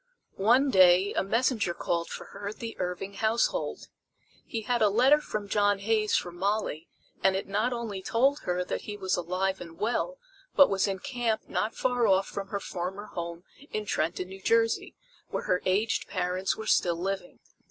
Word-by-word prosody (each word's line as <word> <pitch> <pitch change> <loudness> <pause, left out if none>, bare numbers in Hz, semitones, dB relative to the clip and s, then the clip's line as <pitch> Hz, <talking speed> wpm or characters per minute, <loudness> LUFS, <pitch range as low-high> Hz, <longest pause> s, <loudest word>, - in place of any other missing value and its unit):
One 255 +7 +4
day 185 0 +6
a - - +1
messenger 220 -3 +1
called 170 -1 -1
for - - -7
her 200 - -6
at 215 - -7
the 230 -1 -6
Irving 180 +2 -3
household. 220 +3 0 0.6
He 225 - -3
had 245 0 0
a 210 - +5
letter 260 +8 +5
from 210 -7 -4
John 205 0 +2
Hays 215 +1 +1
for 175 - 0
Molly, 185 -3 -2 0.4
and 190 0 +4
it 195 - -3
not 210 +5 0
only 230 -5 -4
told 270 +9 +2
her 180 0 -1
that - - -3
he 210 -1 -6
was 190 -1 0
alive 185 +2 -1
and 165 -2 -9
well, 245 - -1 0.4
but 280 - +7
was 195 0 +2
in 195 -1 -1
camp 235 +1 -2
not 220 - -1
far 245 -2 +1
off 195 0 +4
from 195 -1 -5
her 200 0 -3
former 190 +3 -5
home 170 0 -5 0.3
in 215 0 -3
Trenton, 180 -1 -1
New 190 0 -10
Jersey, 225 +2 +1 0.3
where - - -3
her 180 0 +1
aged 210 +5 +1
parents 185 0 -1
were 220 - -6
still 175 -5 +3
living. 195 +8 -4
200 Hz, 185 wpm, -28 LUFS, 185-225 Hz, 0.6 s, but